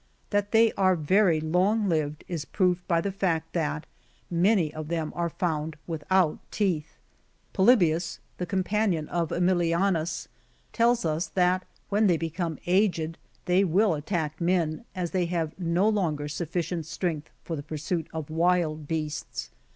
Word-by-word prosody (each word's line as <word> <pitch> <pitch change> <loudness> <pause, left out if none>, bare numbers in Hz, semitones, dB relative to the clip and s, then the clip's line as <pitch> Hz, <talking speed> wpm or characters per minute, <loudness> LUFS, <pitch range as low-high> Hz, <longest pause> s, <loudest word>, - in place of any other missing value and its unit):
That 205 -1 +1
they 225 0 +5
are 185 -1 +3
very 175 +1 +3
long 185 +7 +2
lived 155 -3 -1
is 170 -4 -3
proved 180 0 0
by 170 -1 +2
the 200 - -2
fact, 165 -4 -1
that 160 -2 -1 0.5
many 175 -2 +3
of 155 -1 -6
them 160 -2 -2
are 170 0 0
found 160 -3 -2
without 165 +1 +1
teeth. 175 -7 -1 0.6
Polybius,^ 180 -6 +3 0.2
the 180 - -2
companion 190 -4 0
of 170 -2 -1
^milianus, 175 -1 +1 0.5
tells 235 -3 +3
us, 160 +2 0
that 185 0 +1 0.2
when 210 +1 +3
they 175 -3 +3
become 165 0 -3
aged 175 -4 +1 0.3
they 180 +2 +4
will 195 +2 +3
at 150 -1 -5
tack 160 -5 -2
men, 170 +3 +1
as 180 -2 -2
they 180 -3 +1
have 165 -3 -1
no 175 +3 +2
longer 165 -9 0
sufficient 170 +1 -3
strength 165 -2 -3
for 165 - -4
the 145 - -4
pursuit 155 +2 -3
of 160 -2 -5
wild 160 -2 +1
beasts. 155 -2 -4
170 Hz, 150 wpm, -27 LUFS, 160-185 Hz, 0.6 s, they